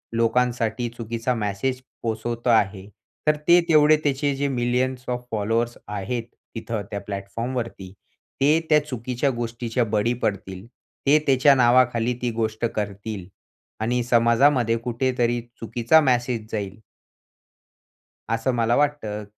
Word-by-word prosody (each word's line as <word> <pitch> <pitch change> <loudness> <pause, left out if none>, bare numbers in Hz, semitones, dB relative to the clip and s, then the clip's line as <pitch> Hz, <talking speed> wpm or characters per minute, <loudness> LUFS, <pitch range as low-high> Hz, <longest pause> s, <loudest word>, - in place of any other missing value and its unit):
लोकांसाठी 120 0 +1
चुकीचा 115 +2 -2
मेसेज 115 +5 -2 0.2
पोहचवतो 115 +2 -2
आहे 100 -3 +2 0.4
तर 150 - +5
ते 175 +1 +7
तेवढे 155 -1 +6
त्याचे 140 0 0
जे 140 +1 -1
मिलियन्स 125 0 -1
ऑफ 125 0 -3
फॉलोवर्स 115 +3 -1
आहेत 105 +4 -3 0.3
तिथं 115 -1 -3
त्या 100 - -3
प्लॅटफॉर्म 100 +6 -5
वरती, 105 -6 -5 0.5
ते 150 +4 +5
त्या 150 -1 +5
चुकीच्या 125 0 -2
गोष्टीच्या 120 0 -2
बळी 115 +4 +2
पडतील 95 -1 -3 0.4
ते 150 +2 +6
त्याच्या 135 +1 +5
नावाखाली 120 -1 +3
ती 120 -1 0
गोष्ट 110 0 -2
करतील 100 -2 -4 0.5
आणि 120 +2 0
समाजामध्ये 120 +1 +3
कुठेतरी 120 0 0 0.2
चुकीचा 120 +6 +3
मेसेज 120 -4 0
जाईल. 100 -3 -3 1.5
असं 115 +3 0
मला 115 0 +2
वाटतं 140 -8 -1
120 Hz, 120 wpm, -23 LUFS, 110-130 Hz, 1.5 s, ते